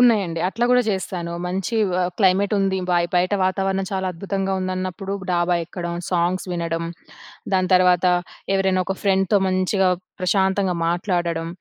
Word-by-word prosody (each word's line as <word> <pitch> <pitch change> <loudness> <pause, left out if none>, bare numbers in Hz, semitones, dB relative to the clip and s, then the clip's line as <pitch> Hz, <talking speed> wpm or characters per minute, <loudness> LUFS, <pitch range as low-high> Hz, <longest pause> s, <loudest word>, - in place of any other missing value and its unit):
ఉన్నాయండి. 200 -9 +3
అట్లా 230 +5 -1
గూడా 250 0 +5
చేస్తాను. 180 -3 -3
మంచి 190 +5 -2 0.3
ఆహ్, 180 - +1
క్లైమేట్ 195 +1 +3
ఉంది. 195 -1 +1
బయ్ 175 -1 +2
బయట 180 +3 +2
వాతావరణం 190 0 0
చాలా 190 -1 -2
అద్భుతంగా 195 +2 -2
ఉందన్నప్పుడు 185 +1 -3 0.2
డాబా 175 0 +2
ఎక్కడం, 175 0 -5 0.2
సాంగ్స్ 180 +1 0
వినడం. 165 -1 -2 0.7
దాని 185 -1 +2
తర్వాత 180 0 +4 0.5
ఎవరైనా 190 -1 +2
ఒక 195 - -1
ఫ్రెండ్‌తో 195 0 +2
మంచిగా, 185 +1 +2 0.3
ప్రశాంతంగా 190 0 +1
మాట్లాడడం. 170 -2 -1
185 Hz, 135 wpm, -22 LUFS, 175-195 Hz, 0.7 s, గూడా